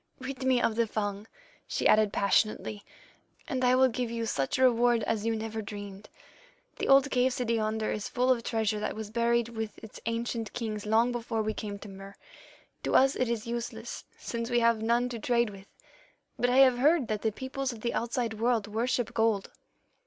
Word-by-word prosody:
"'Rid 265 0 -6
me 260 -1 +3
of 225 -2 0
the 230 -1 +2
Fung,' 205 0 -3 0.4
she - - +1
added 215 -1 +4
passionately, 205 +1 +1 0.6
'and 260 -5 -2
I 250 0 +5
will 260 0 +5
give 245 -1 -2
you 230 0 -3
such 135 -11 -1
a 260 - +2
reward 240 -2 +4
as 220 0 -1
you 225 - +1
never 220 0 -4
dreamed. 205 -1 -8 0.7
The - - -2
old 275 +1 +5
cave 255 0 +2
city 240 -2 -1
yonder 220 -1 -1
is 210 - -3
full 250 +1 +2
of 245 -2 +2
treasure 220 -2 -1
that 210 - -3
was 215 -1 -6
buried 235 0 +1
with 220 -2 -5
its 220 - -11
ancient 230 -1 -2
kings 215 -3 -4
long 225 +3 +3
before 230 -2 -2
we 215 0 -1
came 205 -2 -5
to 205 - -11
Mur. 195 0 -10 0.7
To - - -1
us 270 +1 +5
it 255 - 0
is 230 -2 -2
useless, 235 0 -5
since 230 0 -4
we 240 -1 +3
have 230 -1 +3
none 235 +2 +2
to 235 -2 -5
trade 235 -1 +1
with, 195 0 -13 0.7
but 245 - +2
I 250 - +2
have 260 -2 +6
heard 295 -1 +3
that 215 -1 -2
the 220 - +1
peoples 260 +3 -4
of 230 -2 -10
the 235 - -1
outside 235 -1 -1
world 230 -2 +1
worship 235 +3 -1
gold. 225 -3 +1
230 Hz, 200 wpm, -29 LUFS, 215-245 Hz, 0.7 s, have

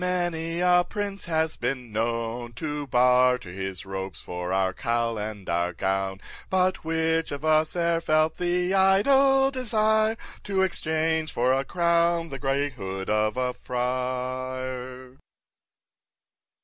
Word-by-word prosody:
many 175 -2 -1
a 180 0 +5
prince 200 -1 -4
has 160 -2 0
been 125 -1 -3
known 115 +2 -2
To 145 +2 -4
barter 125 -4 +3
his 95 0 -5
robes 95 -1 -5
for 90 0 -5
our 95 0 +1
cowl 115 +1 -1
and 105 -2 -6
our 85 +1 0
gown, 95 +1 -1 0.3
But 185 0 +1
which 160 0 0
of 145 +2 -5
us 155 +1 +3
e'er 170 -1 +1
felt 155 -1 +2
the 180 +1 0
idle 270 +8 +4
desire 220 -3 +1 0.3
To 195 -2 +1
exchange 160 -2 0
for 125 +2 +2
a 135 +1 +1
crown 170 +1 +1
the 135 -1 -6
grey 140 +1 0
hood 95 -5 -5
of 110 +2 +1
a 125 0 0
Friar! 130 +1 -4
135 Hz, 130 wpm, -26 LUFS, 120-170 Hz, 0.3 s, a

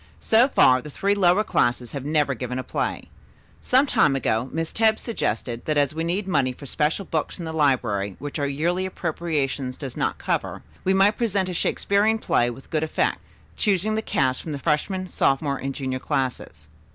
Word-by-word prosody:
"So 230 +3 +4
far 130 - +4
the 150 - -9
three 200 +7 0
lower 195 0 +3
classes 120 - 0
have 140 -2 -5
never 150 -1 +1
given 125 0 -4
a 130 - -3
play. - - -3 0.5
Some 260 +3 +4
time 150 - +3
ago 125 -1 0
Miss 165 0 -3
Tebbs 220 -1 +3
suggested 120 - -3
that 155 -1 0
as 145 0 +2
we 160 +1 -2
need 185 +4 -1
money 130 -9 +1
for 140 - -12
special 150 +8 0
books 160 -2 -2
in 170 - -6
the 160 - -5
library 120 -10 +1
which 145 +2 -6
our 140 - 0
yearly 170 +7 -1
appropriation 155 -7 -2
does 135 -4 -7
not - - -1
cover, - - -2 0.2
we 190 +1 +2
might 200 +2 +4
present 200 -5 0
a - - -3
Shakespearian 205 +5 +1
play 120 - +1
with 120 +3 -11
good 155 - +1
effect, 160 - 0 0.4
choosing 210 0 +1
the 220 - 0
cast 130 -10 0
from 155 - -6
the - - -3
freshman, 170 +6 -1
sophomore 140 -3 +1
and 135 0 -4
junior 130 -2 -3
classes. 125 - -3
150 Hz, 190 wpm, -24 LUFS, 130-190 Hz, 0.5 s, So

